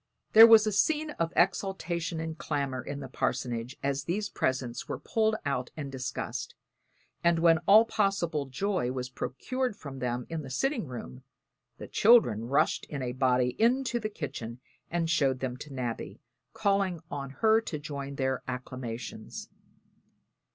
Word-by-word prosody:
There 225 +1 +11
was 225 -1 +8
a 215 - +1
scene 305 +9 +1
of 165 0 0
exultation 175 -2 0
and 160 0 -4
clamor 140 -5 -2
in 145 +3 -6
the 135 - -6
parsonage 120 0 -2
as 140 0 -1
these 200 +5 -1
presents 130 -6 -2
were - - -2
pulled 220 -1 +1
out 130 -3 -1
and 140 -3 -5
discussed; 130 -2 -4 0.7
and 170 0 +4
when 165 -1 +5
all 215 +3 +8
possible 175 -10 0
joy 135 -2 -1
was 130 0 -4
procured 250 - -3
from 140 -8 -9
them 125 0 -2
in 165 -1 -4
the 135 - -8
sitting 230 - -1
room, 90 - -8 0.6
the - - -8
children 200 - +5
rushed 140 +5 +1
in 140 -3 -5
a 125 - -2
body 125 -1 +2
into 245 +1 +2
the 215 -1 -3
kitchen 130 - -6 0.3
and 170 -1 0
showed 140 -6 +2
them 130 -2 -3
to 150 - -10
Nabby, 125 -3 -4 0.3
calling 200 -6 0
on 140 -1 -4
her 220 +11 +3
to 170 -8 -5
join 140 -2 -6
their 130 -1 -1
acclamations. 125 -2 -6
145 Hz, 155 wpm, -29 LUFS, 130-195 Hz, 0.7 s, There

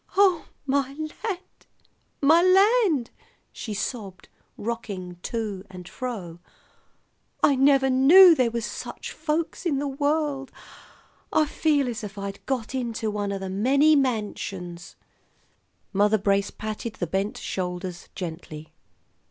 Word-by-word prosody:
"Oh, 380 -5 +4 0.2
my 275 0 0
land! 355 +5 -6 0.6
my 320 +4 +6
land!" 375 - +4 0.4
she 215 -3 -6
sobbed, 200 -3 -5 0.3
rocking 200 -6 -5
to 210 -4 -4
and 180 -2 -10
fro. 190 -11 -6 1.0
"I 280 - +5
never 270 0 +4
knew 315 +8 +8
there 255 -6 +2
was 230 -1 -3
such - - -7
folks 315 +3 -2
in 320 -6 0
the 285 +1 -1
world. 285 0 -1 0.8
I 310 - +3
feel 295 -1 +1
just 240 -2 -4
as 210 - -4
if 200 - -22
I'd 200 0 -6
got 255 -3 -2
into 230 -4 -2
one 205 -1 -2
o' 200 - -2
the 190 0 -5
many 270 +11 +4
mansions!" 200 -9 -2 1.0
Mother 205 +2 +3
Brace 200 0 +1
patted 215 +1 -5
the 175 - -2
bent 195 +5 -2
shoulders 180 -1 -5
gently. 160 -3 -7
235 Hz, 125 wpm, -25 LUFS, 195-285 Hz, 1.0 s, knew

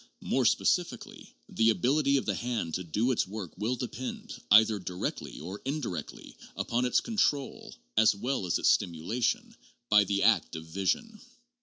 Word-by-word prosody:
More - - +1
specifically, - - -1
the 115 0 +2
ability 140 +5 +2
of 135 - -2
the 105 - 0
hand 115 -6 -3
to 90 - -2
do 105 +10 0
its 120 - 0
work 100 -3 -7
will 110 +6 -1
depend, 125 +1 -6 0.2
either 105 0 +6
directly 90 0 -5
or 95 +6 -7
indirectly, 130 - -5 0.2
upon 120 +2 -1
its 125 - +2
control, 150 - -1 0.2
as 110 -2 +5
well 115 -1 -2
as 85 - +1
its - - +2
stimulation, 120 - 0 0.3
by 105 -1 +6
the 100 0 0
act - - +3
of 80 0 -7
vision. 100 - -2
110 Hz, 155 wpm, -29 LUFS, 95-130 Hz, 0.3 s, either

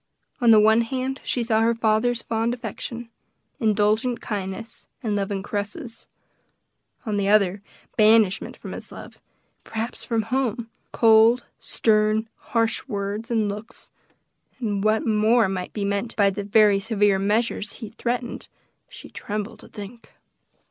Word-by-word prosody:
On 240 - +3
the 220 -1 +8
one 220 +2 +5
hand 260 +3 -3
she 245 - -1
saw 220 -1 +2
her 230 +1 +3
father's 230 +2 +1
fond 230 +1 -1
affection, 235 -1 -7 0.5
indulgent 220 +2 +1
kindness, 205 +1 -6 0.2
and 215 -3 0
loving 195 -1 -2
caresses; 220 - -5 1.0
on 215 -2 -1
the 200 0 +1
other, 200 -2 +3 0.4
banishment 215 -3 +4
from - - -9
his - - -6
love, - - -11 0.4
perhaps 225 +2 -5
from 225 -2 0
home, 235 -1 -2 0.2
cold, 225 +2 +5 0.2
stern, 215 0 +2
harsh 230 +2 -1
words 205 0 -4
and 220 -3 +1
looks; 210 +4 -8 0.7
and 205 -5 -2
what 215 +1 +2
more 220 +1 +3
might 185 -1 -4
be 205 -2 -3
meant 200 +3 -2
by 200 -2 +4
the 200 +1 -4
very 205 -1 +4
severe 205 -2 +2
measures 210 +1 -1 0.2
threatened, 240 0 -3 0.4
she - - -10
trembled 210 +2 -5
to - - -13
think. 210 +3 -11
220 Hz, 135 wpm, -24 LUFS, 205-230 Hz, 1.0 s, the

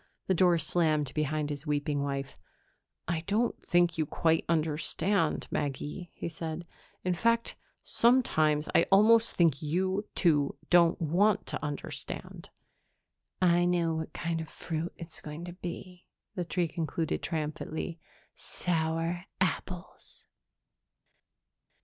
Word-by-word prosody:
The 190 - +2
door 180 -1 +4
slammed 155 -3 +1
behind 150 0 -1
his 145 +2 -5
weeping 145 -1 0
wife. 140 -1 -3 0.7
"I 165 -1 -1
don't 225 +4 0
think 175 -1 +2
you 155 - +1
quite 160 +1 +2
understand, 165 +3 +1
Maggie," 150 +5 -3
he - - -4
said. 165 0 -5 0.4
"In 185 - +1
fact, 230 +6 +1 0.3
sometimes 155 -12 +3
I - - +4
almost 225 +3 +6
think 165 -6 +3
you, 185 +6 0
too, 150 -6 +2
don't 175 +1 +5
want 190 +6 +2
to - - -4
understand." 145 -1 -5 0.9
"I 175 0 +4
know 175 -2 +2
what 160 0 -4
kind 165 0 -2
of 160 - -7
fruit 165 +1 -4
it's 165 -1 -8
going 155 +3 -7
to 175 - -7
be," 180 0 -8 0.3
the 180 -4 -3
tree 175 0 0
concluded 160 0 -2
triumphantly. 155 +2 -3 0.3
"Sour 165 +1 -2
apples." 180 0 -3
165 Hz, 120 wpm, -30 LUFS, 155-180 Hz, 0.9 s, almost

